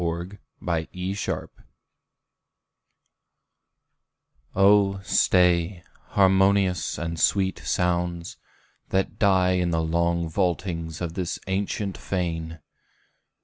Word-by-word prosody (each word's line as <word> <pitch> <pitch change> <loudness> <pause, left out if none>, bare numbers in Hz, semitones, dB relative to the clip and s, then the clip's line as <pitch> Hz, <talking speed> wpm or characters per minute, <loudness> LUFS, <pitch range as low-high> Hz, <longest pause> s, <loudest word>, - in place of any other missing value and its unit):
Oh, 100 0 +4
stay, 90 -1 +2 0.3
harmonious 95 -1 +3
and 85 +1 -4
sweet 95 +1 +2
sounds, 85 -1 -1 0.5
that 95 0 -1
die 95 -3 +4
In 90 -1 +1
the 80 -1 0
long 85 +1 0
vaultings 85 -2 -2
of 85 -2 -3
this 90 -1 -3
ancient 100 +1 -2
fane! 80 -3 -3
90 Hz, 70 wpm, -25 LUFS, 85-95 Hz, 0.5 s, Oh